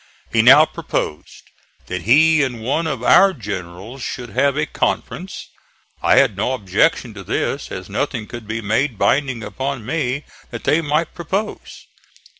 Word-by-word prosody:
He -, -, +5 dB
now -, -, +8 dB
proposed 75 Hz, -, -5 dB, 0.3 s
that 90 Hz, -1 st, -4 dB
he 155 Hz, -, +5 dB
and 125 Hz, -5 st, -2 dB
one 155 Hz, +7 st, 0 dB
of 135 Hz, -6 st, -3 dB
our 195 Hz, +8 st, +6 dB
generals 100 Hz, -, -7 dB
should 125 Hz, -2 st, -5 dB
have 140 Hz, +7 st, +1 dB
a 150 Hz, -, +1 dB
conference. 180 Hz, +3 st, -3 dB, 0.5 s
I -, -, +4 dB
had 130 Hz, -7 st, +4 dB
no 110 Hz, +6 st, -1 dB
objection 110 Hz, -, +1 dB
to 100 Hz, -2 st, -9 dB
this, -, -, -2 dB
as -, -, -6 dB
nothing 110 Hz, -, -2 dB
could 120 Hz, -1 st, -9 dB
be 110 Hz, +2 st, -3 dB
made 110 Hz, +4 st, 0 dB
binding 130 Hz, -1 st, +1 dB
upon 135 Hz, -2 st, -4 dB
me 140 Hz, 0 st, -2 dB, 0.3 s
that -, -, -7 dB
they 150 Hz, +4 st, +2 dB
might 155 Hz, +1 st, -1 dB
propose. 190 Hz, +5 st, -5 dB
130 Hz, 155 wpm, -20 LUFS, 110-150 Hz, 0.5 s, now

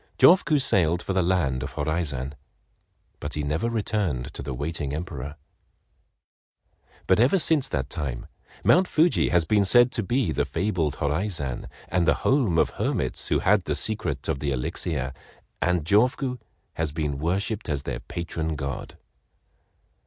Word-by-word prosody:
Jofuku 170 Hz, -3 st, +6 dB
sailed 90 Hz, -9 st, +2 dB
for 95 Hz, -, -2 dB
the 95 Hz, -, +2 dB
land 85 Hz, -8 st, +1 dB
of -, -, -5 dB
Horaizan, 75 Hz, -3 st, -2 dB, 0.9 s
but 75 Hz, -, -5 dB
he 75 Hz, -, -2 dB
never 80 Hz, +11 st, -1 dB
returned 105 Hz, -, -1 dB
to -, -, -7 dB
the 70 Hz, -, -5 dB
waiting 75 Hz, +1 st, -3 dB
Emperor; 75 Hz, -3 st, -5 dB, 1.7 s
but 95 Hz, -, +3 dB
ever 130 Hz, +11 st, +5 dB
since 160 Hz, -5 st, +2 dB
that 65 Hz, -2 st, -2 dB
time 70 Hz, -8 st, -4 dB, 0.4 s
Mount 185 Hz, +2 st, +5 dB
Fuji 165 Hz, +1 st, +3 dB
has 85 Hz, -2 st, +3 dB
been 105 Hz, +5 st, +3 dB
said 120 Hz, +5 st, +5 dB
to -, -, 0 dB
be 120 Hz, +4 st, 0 dB
the -, -, +1 dB
fabled 85 Hz, -5 st, -1 dB
Horaizan 75 Hz, -, -2 dB, 0.2 s
and 90 Hz, 0 st, +1 dB
the -, -, +5 dB
home 125 Hz, -, +3 dB
of -, -, +3 dB
hermits -, -, -2 dB
who -, -, +2 dB
had 100 Hz, -1 st, +3 dB
the -, -, -1 dB
secret 75 Hz, -11 st, -2 dB
of 75 Hz, -4 st, -1 dB
the 75 Hz, -, -2 dB
elixir, 65 Hz, 0 st, -2 dB, 0.5 s
and 90 Hz, -3 st, +1 dB
Jofuku 125 Hz, -, +2 dB, 0.3 s
has 80 Hz, -2 st, -2 dB
been 75 Hz, -3 st, -2 dB
worshiped 95 Hz, +7 st, -1 dB
as 70 Hz, -2 st, -1 dB
their -, -, -4 dB
patron 80 Hz, -2 st, -4 dB
god. 70 Hz, -2 st, -5 dB
85 Hz, 150 wpm, -25 LUFS, 75-105 Hz, 1.7 s, Jofuku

